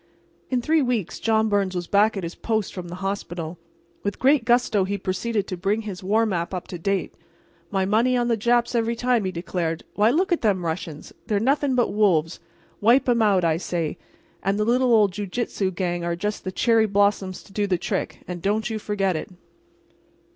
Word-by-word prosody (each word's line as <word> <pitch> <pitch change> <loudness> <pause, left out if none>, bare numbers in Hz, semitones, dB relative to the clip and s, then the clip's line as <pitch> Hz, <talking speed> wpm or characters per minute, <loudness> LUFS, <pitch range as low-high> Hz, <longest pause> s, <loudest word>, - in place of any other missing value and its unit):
In 250 -2 0
three 315 +2 +3
weeks 240 - -1
John 220 -1 +2
Byrnes 200 -3 0
was 175 -1 -2
back 205 +3 +3
at 190 - -3
his 170 +1 -4
post 220 -3 -2
from 180 -2 -6
the 175 - -7
hospital. 175 -4 -4 0.4
With 200 - -2
great 270 -2 +3
gusto 240 -4 +3
he 200 +2 -2
proceeded 200 +3 -2
to 185 - -4
bring 200 +5 0
his 195 -4 -7
war 215 +4 +2
map 180 -3 -2
up 180 - -5
to 175 - -6
date. 195 +3 -1 0.6
"My 190 -2 0
money 230 +6 +2
on 240 -1 +1
the 235 - +2
Japs 240 +2 +1
every 230 0 +1
time," 240 -3 +1
he 185 - -1
declared. 170 -2 -3
"Why, 210 +2 +3
look 360 +9 +1
at 345 - +2
them 195 -6 +1
Russians—they're 165 +5 -4
nothing 275 +3 +1
but 245 -4 +1
wolves. 180 -6 +2 0.4
Wipe 245 +5 +4
'em 240 -2 +3
out, 200 -4 +3
I 160 -1 +2
say—and 170 +2 -4
the 210 - +2
little 250 +2 +3
old 210 -4 +5
jiu 205 +2 -5
jitsu 200 -2 -2
gang 175 -1 -2
are 170 0 -1
just 210 +4 -3
the 185 - -2
cherry 225 +2 +3
blossoms 200 -2 +1
to 195 - -18
do 205 -1 0
the 185 -2 +1
trick, - - -3
and 180 -1 -5
don't 215 +4 0
you 220 - -2
forget 195 -3 -1
it!" 155 - -4
205 Hz, 200 wpm, -24 LUFS, 185-230 Hz, 0.6 s, old